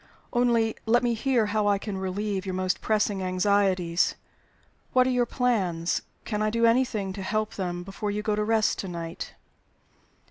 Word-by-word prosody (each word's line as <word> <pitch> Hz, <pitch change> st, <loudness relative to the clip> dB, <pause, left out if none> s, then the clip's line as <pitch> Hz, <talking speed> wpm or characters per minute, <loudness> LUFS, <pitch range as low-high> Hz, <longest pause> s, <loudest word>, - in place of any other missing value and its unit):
Only 235 Hz, -2 st, +2 dB
let 240 Hz, +2 st, +4 dB
me 240 Hz, -1 st, +2 dB
hear 240 Hz, -1 st, +1 dB
how 210 Hz, 0 st, 0 dB
I 200 Hz, -1 st, +4 dB
can 200 Hz, 0 st, -5 dB
relieve 190 Hz, +1 st, -2 dB
your 190 Hz, -2 st, -3 dB
most 185 Hz, 0 st, -1 dB
pressing 210 Hz, -2 st, +1 dB
anxieties. 185 Hz, -2 st, +2 dB, 0.8 s
What 255 Hz, 0 st, +5 dB
are 260 Hz, -, +1 dB
your 245 Hz, -1 st, +2 dB
plans? 190 Hz, -10 st, 0 dB, 0.2 s
Can 210 Hz, -2 st, -2 dB
I 215 Hz, -, +2 dB
do 230 Hz, +1 st, +2 dB
anything 230 Hz, -5 st, +2 dB
to 195 Hz, -, -6 dB
help 215 Hz, +3 st, -1 dB
them 175 Hz, -2 st, -3 dB
before 195 Hz, +2 st, -4 dB
you 210 Hz, +1 st, -2 dB
go 210 Hz, -1 st, +1 dB
to 210 Hz, -, 0 dB
rest 220 Hz, 0 st, +2 dB
to 195 Hz, -, -3 dB
night?" 170 Hz, -2 st, -6 dB
210 Hz, 175 wpm, -27 LUFS, 190-225 Hz, 0.8 s, What